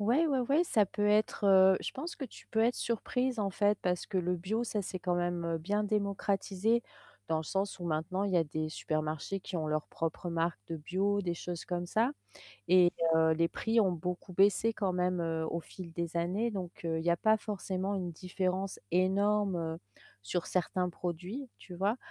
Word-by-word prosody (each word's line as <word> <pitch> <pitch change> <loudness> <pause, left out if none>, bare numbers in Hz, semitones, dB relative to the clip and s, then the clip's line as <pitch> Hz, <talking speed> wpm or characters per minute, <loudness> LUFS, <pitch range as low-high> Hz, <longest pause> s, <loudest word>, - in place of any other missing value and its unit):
Ouais, 245 +11 +3
ouais, 275 -4 +2
ouais, 285 +8 +3
ça 215 - +3
peut 205 +2 -1
être, 210 0 +2
heu, 190 -1 +7
je - - -4
pense 320 +6 -5
que 280 - -4
tu - - -12
peux 220 - -2
être 235 +2 +4
surprise 250 +2 -1
en 200 -2 0
fait, 205 +2 +2
parce 180 -1 -1
que 190 - -1
le 180 0 +1
bio, 210 +7 -1
ça 210 -3 -2
s'est 185 0 -5
quand 180 0 0
même, 175 -1 -1
heu, 165 - 0
bien 205 +6 0
démocratisé, 205 +1 0 0.5
dans 160 - +2
le 160 - -2
sens 195 +2 -2
où 175 - -6
maintenant, 170 +4 -1
il 200 - -1
y - - +4
a 170 - +5
des 155 +1 -3
supermarchés 155 +4 -2
qui 185 -1 -6
ont 155 -2 -2
leur 155 0 -1
propre 165 +2 -3
marque 165 0 0
de 165 - -4
bio, 195 +6 0
des 175 -2 -1
choses 175 0 -5
comme 175 -1 -2
ça 225 +7 +2 0.6
et 180 -1 +6 0.2
heu, 160 0 +4
les 165 +1 +2
prix 225 0 +2
ont 190 - +3
beaucoup 180 +2 -4
baissé 200 +4 +4
quand 200 -4 -1
même, 180 0 +1
heu, 165 -1 -1
au 170 - -2
fil 170 +1 -10
des 170 0 -4
années. 190 +8 0
Donc, 180 -3 -6
heu, 165 -1 0
il 160 - -5
y 175 - +4
a 170 - +3
pas 220 +5 +4
forcément 195 -2 -3
une 180 -2 -3
différence 185 +2 -2
énorme, 195 +1 +2
heu, 160 -1 -3 0.5
sur 170 - -2
certains 180 0 0
produits, 180 - -5
tu 180 - -11
vois, 200 +6 +1
185 Hz, 210 wpm, -32 LUFS, 170-205 Hz, 0.6 s, heu